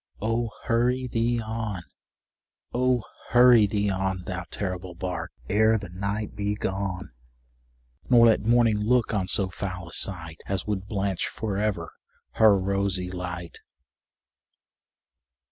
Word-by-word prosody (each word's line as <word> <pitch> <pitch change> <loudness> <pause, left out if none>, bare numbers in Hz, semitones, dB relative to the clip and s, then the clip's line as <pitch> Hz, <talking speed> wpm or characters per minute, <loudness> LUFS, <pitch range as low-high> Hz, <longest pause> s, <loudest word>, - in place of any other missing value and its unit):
Oh! 115 +2 0
hurry 125 +2 +1
thee 120 0 0
on 110 -4 -4 0.9
oh! 125 -1 +2 0.3
hurry 120 -3 +7
thee 100 0 0
on, 95 -1 -1
Thou 95 0 -4
terrible 95 -2 -4
bark, 90 -2 -4 0.2
ere 110 +2 +4
the 100 -3 -7
night 100 +4 -3
be 105 0 -1
gone, 95 - -3 1.0
Nor 120 -2 +7
let 115 -2 +5
morning 115 -1 +3
look 120 +2 +2
on 95 -3 0
so 95 0 -1
foul 90 -2 -5
a - - -12
sight 80 -5 -4
As 95 -1 -1
would 100 -2 -3
blanch 100 -3 -1
for 105 -3 -4
ever 100 -5 -1 0.4
her 110 -3 +5
rosy 95 -1 -1
light! 90 -2 -6
100 Hz, 130 wpm, -26 LUFS, 95-115 Hz, 1.0 s, hurry